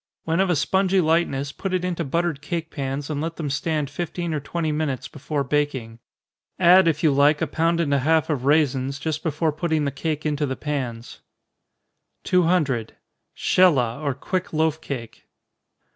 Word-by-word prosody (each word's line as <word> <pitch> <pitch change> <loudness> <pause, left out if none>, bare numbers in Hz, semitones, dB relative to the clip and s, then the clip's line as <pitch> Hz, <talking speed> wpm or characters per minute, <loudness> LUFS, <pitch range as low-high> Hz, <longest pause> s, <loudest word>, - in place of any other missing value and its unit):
When 165 +2 0
of 190 -1 +2
a 175 - +3
spongy 190 +5 +2
lightness, 155 -5 +1
put 190 +5 -3
it 180 0 -1
into 175 -2 -2
buttered 165 0 -1
cake 165 +1 -4
pans, 135 0 -3
and 145 -1 -2
let 165 +1 -3
them 150 -4 -3
stand 150 +1 -1
fifteen 170 +3 -4
or 150 - -1
twenty 160 +2 -2
minutes 150 -4 -2
before 145 0 -3
baking. 135 -6 -2 0.6
Add 180 0 +6
if 160 -1 0
you 155 - +5
like 145 +2 +4
a - - +1
pound 165 +3 0
and 150 -4 +1
a 140 - +3
half 160 +3 +2
of 145 -6 -2
raisins, 140 -2 +2
just 155 +1 -3
before 160 0 0
putting 155 -1 -1
the 140 - -1
cake 155 +2 -3
into 150 -1 0
the 130 - -2
pans. 130 -6 -4 1.0
200. 160 -10 +1 0.4
_Shelah, 140 -9 +3
or 140 -3 -1
Quick 185 +6 -3
Loaf 160 0 +1
Cake. 120 -7 -7
155 Hz, 175 wpm, -23 LUFS, 140-165 Hz, 1.0 s, Add